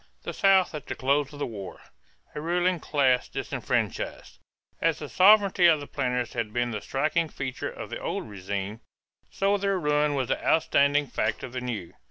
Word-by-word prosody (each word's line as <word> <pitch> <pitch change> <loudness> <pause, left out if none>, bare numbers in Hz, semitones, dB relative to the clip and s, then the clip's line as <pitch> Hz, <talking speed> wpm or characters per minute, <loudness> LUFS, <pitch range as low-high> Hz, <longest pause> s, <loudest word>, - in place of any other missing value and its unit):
THE - - -5
SOUTH 195 -3 +4
AT 150 -3 -7
THE - - -4
CLOSE 140 +1 +1
OF 145 - -10
THE 145 - -2
WAR 100 -5 -8 0.5
=A 150 - -5
Ruling 175 +2 +1
Class 130 -5 +1
Disfranchised.= - - -3 0.4
As - - +2
the - - -7
sovereignty 195 -2 +5
of 160 -3 +5
the 145 - -7
planters 125 -3 -2
had 115 -4 -3
been 120 +1 -1
the 105 -2 -4
striking 155 +4 0
feature 130 -3 -4
of - - -8
the - - -4
old - - -3
régime, 100 +1 -5 0.5
so 200 +1 +1
their 195 -1 0
ruin 150 -1 +1
was 130 -3 -1
the - - -1
outstanding 145 -2 +3
fact 110 -4 -2
of 125 - -6
the 125 - -3
new. 115 -8 -5
140 Hz, 185 wpm, -27 LUFS, 120-170 Hz, 0.5 s, sovereignty